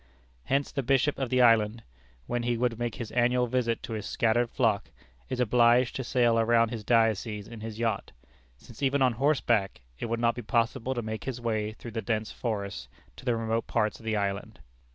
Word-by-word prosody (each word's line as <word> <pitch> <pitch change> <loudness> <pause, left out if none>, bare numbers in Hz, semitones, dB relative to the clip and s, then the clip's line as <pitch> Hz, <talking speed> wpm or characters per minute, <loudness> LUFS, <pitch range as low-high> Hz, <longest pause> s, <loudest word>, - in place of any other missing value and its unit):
Hence 140 +1 0
the 140 - -1
bishop 135 +3 +1
of 135 -2 -1
the 125 -1 +4
island, 115 -1 +4 0.4
when 120 - -2
he 120 0 0
would 120 -1 0
make 120 -2 -2
his 115 -3 -6
annual 125 +1 +2
visit 120 -1 -1
to 115 - -5
his 105 -2 -4
scattered 120 +1 +1
flock, - - 0 0.4
is 130 - -3
obliged 120 +1 +4
to 130 - -2
sail 120 -2 +2
around 115 0 +3
his 115 -2 -5
diocese 110 -2 +1
in 115 -1 -9
his 110 -1 -6
yacht, 115 -1 -1 0.5
since 115 - -15
even 135 0 +2
on 125 -2 +3
horseback 120 - +1 0.2
it - - -3
would 115 0 -2
not 115 0 +2
be 120 - -6
possible 120 +4 0
to 120 - -2
make 110 0 -5
his 130 -2 -4
way 110 -2 -1
through 115 +1 -10
the 115 0 -3
dense 110 +1 -2
forests 100 - -4 0.3
to - - -13
the 120 -2 +2
remote 115 0 -1
parts 105 0 0
of - - -15
the 110 -1 -1
island. 100 +1 -3
115 Hz, 205 wpm, -28 LUFS, 110-125 Hz, 0.5 s, the